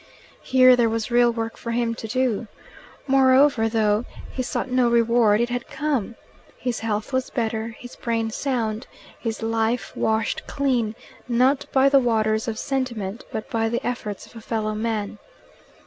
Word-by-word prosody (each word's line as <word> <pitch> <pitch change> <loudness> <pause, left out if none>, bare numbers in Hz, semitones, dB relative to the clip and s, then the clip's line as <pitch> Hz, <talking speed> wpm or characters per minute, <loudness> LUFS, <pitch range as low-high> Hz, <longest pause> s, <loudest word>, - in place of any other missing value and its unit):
Here 255 -1 +6
there 235 -2 +3
was 225 +1 -2
real 240 0 +5
work 225 -1 -4
for 235 - -7
him 230 0 0
to 225 - -7
do. 245 -2 0 0.6
Moreover, 265 -3 +4
though 215 0 +1 0.3
he 260 - -3
sought 255 +1 -3
no 250 -1 +3
reward, 230 -2 +4
it 240 - 0
had 245 0 -3
come. 275 -8 -2 0.4
His 245 -2 -3
health 215 +2 -3
was 260 0 0
better, 225 -1 -2
his 245 - -11
brain 225 -1 -2
sound, 230 -3 -2 0.3
his 225 -1 -4
life 225 +2 -1
washed 220 0 -1
clean, 245 -6 0 0.3
not 255 +3 +2
by 265 0 +4
the 275 0 +6
waters 220 -3 +1
of 220 -1 -3
sentiment, 235 -6 -3
but 220 - -4
by 225 -1 +1
the 235 +1 -2
efforts 220 -5 -4
of - - -19
a 225 - -9
fellow 215 -1 -2
man. 215 -1 -3
230 Hz, 165 wpm, -23 LUFS, 220-250 Hz, 0.6 s, Here